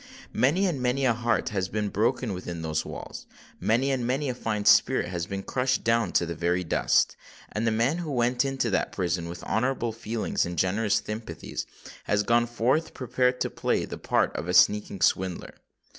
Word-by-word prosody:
Many 165 +10 +2
and 160 -9 -1
many 125 +2 +1
a 120 - +4
heart 115 -1 0
has 95 -3 -2
been 105 -1 -2
broken 110 +1 0
within 85 -2 -6
those 80 -1 -1
walls: - - -8 0.3
many 125 +5 +2
and 130 -2 -1
many 135 +4 0
a - - -1
fine 105 -4 -3
spirit 85 - +4
has 85 -1 -3
been 100 0 -4
crushed 130 +3 0
down 115 -4 +2
to 85 - +3
the 85 - -4
very 90 +2 0
dust; 80 - +2 0.4
and 110 +2 -1
the - - +3
man 120 +9 +1
who 165 -4 -4
went 125 0 +1
into 135 -4 -1
that - - 0
prison 85 -2 -1
with 85 0 -8
honourable 120 0 0
feelings 115 0 -2
and 85 0 -4
generous 100 +5 +1
sympathies, 110 +1 -6 0.4
has 105 0 +1
gone 120 +2 +3
forth 125 +7 0
prepared 125 0 0
to - - 0
play - - 0
the - - -8
part - - +1
of 85 - -4
a 90 - 0
sneaking 105 -1 +4
swindler. 95 -1 0
115 Hz, 190 wpm, -27 LUFS, 95-125 Hz, 0.4 s, a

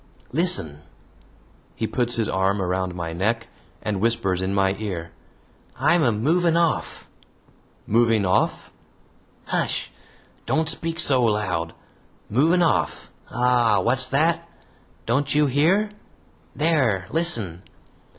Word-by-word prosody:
"Listen!" 130 - 0 0.9
He 110 - -2
puts 120 +1 -1
his 115 -2 0
arm 95 +2 0
around 95 -1 -2
my 85 -2 -4
neck 115 +7 -1 0.3
and 100 -3 -2
whispers 95 -5 +1
in 95 +1 -2
my 95 -1 +2
ear, 90 -6 -5 0.7
"I'm 175 - +3
a 125 -6 +3
MOVING 165 +10 +1
OFF!" 170 -2 -1 0.8
"Moving 115 -2 +2
off?" 90 - 0 0.7
"Hush! - - -2 0.6
Don't 160 0 +1
speak 165 +1 -2
so 135 -5 +4
loud. 95 -7 -1 0.6
Moving 165 +10 +3
off. 165 - -1 0.2
Ah! 120 -1 +2
wot's 130 +3 +1
that? 160 +5 +1 0.6
Don't 140 +4 0
you 150 0 +4
hear? 170 +10 +2 0.6
there! 135 - +2
listen!" 115 - 0
115 Hz, 110 wpm, -23 LUFS, 95-155 Hz, 0.9 s, so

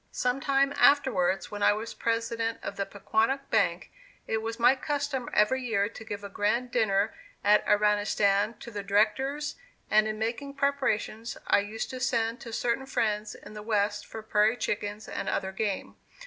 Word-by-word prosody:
Sometime 275 +2 +1
afterwards 245 -11 +3
when 205 0 -6
I 205 - +5
was 220 +2 -5
President 230 0 -1
of - - -4
the 195 - -2
Pequonnock 225 +7 0
Bank, - - +1 0.3
it 220 - -1
was 225 +1 -4
my 250 +3 +5
custom 285 -2 -2
every 235 +5 +3
year 215 -4 +1
to 225 - -10
give 205 -2 -6
a - - -4
grand 215 +5 0
dinner 210 -3 +2 0.3
at 210 +1 +5
Iranistan 210 0 +2
to 235 - -8
the 205 -2 -4
directors, 225 +9 +1 0.3
and 215 0 +5
in 215 0 -3
making 235 +6 -3
preparations 260 -5 -1
I - - +4
used 210 +2 -4
to 255 - -6
send 230 -2 0
to 230 - -8
certain 240 +3 -1
friends 215 -4 -1
in 205 - -12
the 210 - -7
West 210 -1 0
for 220 - -8
prairie 215 +2 +2
chickens 205 0 -3
and - - -3
other 190 -1 -1
game. 200 0 -3
220 Hz, 170 wpm, -28 LUFS, 210-250 Hz, 0.3 s, I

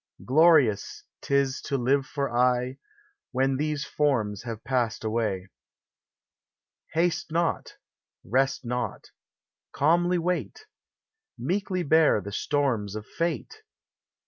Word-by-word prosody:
Glorious 145 - +4 0.2
't - - -9
is 135 -1 +1
to 140 - -2
live 135 +2 +1
for 140 -3 -2
aye, 125 +1 +2 0.6
When 135 +1 +1
these 150 -1 -1
forms 115 -9 0
have 115 -2 -7
passed 120 -5 -1
;iway. 110 -4 -1 1.5
Haste 170 0 0
not! 165 0 -1 0.5
Rest 130 +5 0
not! 120 -2 -4 0.6
Calmly 175 +4 +3
wait 180 - -2 0.4
| 445 0 -64
Meekly 190 -1 0
bear 160 -5 +4
the 100 +1 -7
storms 115 -5 -1
of 105 0 -6
fate! 170 - -3
135 Hz, 110 wpm, -26 LUFS, 120-165 Hz, 1.5 s, Glorious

